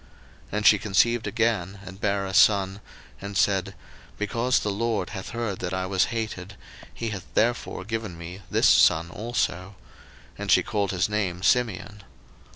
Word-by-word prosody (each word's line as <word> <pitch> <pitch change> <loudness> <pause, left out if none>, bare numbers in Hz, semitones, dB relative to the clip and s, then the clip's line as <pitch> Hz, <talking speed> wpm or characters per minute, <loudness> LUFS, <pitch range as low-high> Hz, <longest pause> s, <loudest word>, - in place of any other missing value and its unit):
01:029:033 - - -25 0.4
And 105 0 -1
she 105 - +7
conceived 110 +4 +2
again, 105 -5 -1
and 95 +2 -11
bare 100 -1 0
a 95 - -5
son; 100 -1 +4 0.4
and 100 0 -5
said, 95 -2 +1 0.4
Because 115 +4 0
the 105 - -1
LORD 110 +1 -1
hath 95 - -6
heard 115 -6 -4
I 95 0 -2
was 95 0 +2
hated, 110 -5 -5 0.4
he 115 - -4
hath 100 -4 -8
therefore 115 -4 0
given 110 -5 -4
me 85 +3 -9
this - - +3
son 80 +2 +4
also: 100 -3 -3 0.6
and - - -4
she - - +5
called 100 -2 -1
his 95 -1 0
name 95 -4 -2
Simeon. 105 -3 0
100 Hz, 160 wpm, -25 LUFS, 95-110 Hz, 0.6 s, she